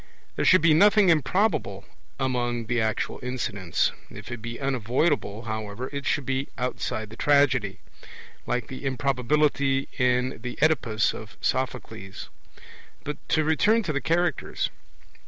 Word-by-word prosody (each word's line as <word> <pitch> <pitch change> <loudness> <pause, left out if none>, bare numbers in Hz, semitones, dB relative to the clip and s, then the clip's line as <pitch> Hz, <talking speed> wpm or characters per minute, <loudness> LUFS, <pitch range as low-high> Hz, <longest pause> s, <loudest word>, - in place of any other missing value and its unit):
There - - -1
should 185 -3 +6
be 165 -2 +6
nothing 205 +3 +6
improbable 155 - +1 0.3
among 120 -3 -1
the 120 +1 0
actual 110 -1 -1
incidents. 100 -9 -1 0.2
If - - -10
it 120 -2 -6
be 115 +1 -6
unavoidable, 130 -3 0
however, 110 +2 -5
it 140 -1 -4
should 145 - 0
be 135 +1 -1
outside 110 -3 -3
the - - -9
tragedy, 135 -8 +2 0.7
like 125 -2 -1
the 130 +4 -9
improbability 135 +1 +1
in 125 0 +1
the 125 0 -6
Oedipus 130 -8 +2
of 110 - -10
Sophocles. 115 -7 -3 0.7
But 150 - -4
to 155 - +3
return 210 +9 +3
to 160 -6 -2
the 140 - -1
Characters. 175 +5 0
130 Hz, 135 wpm, -26 LUFS, 115-150 Hz, 0.7 s, should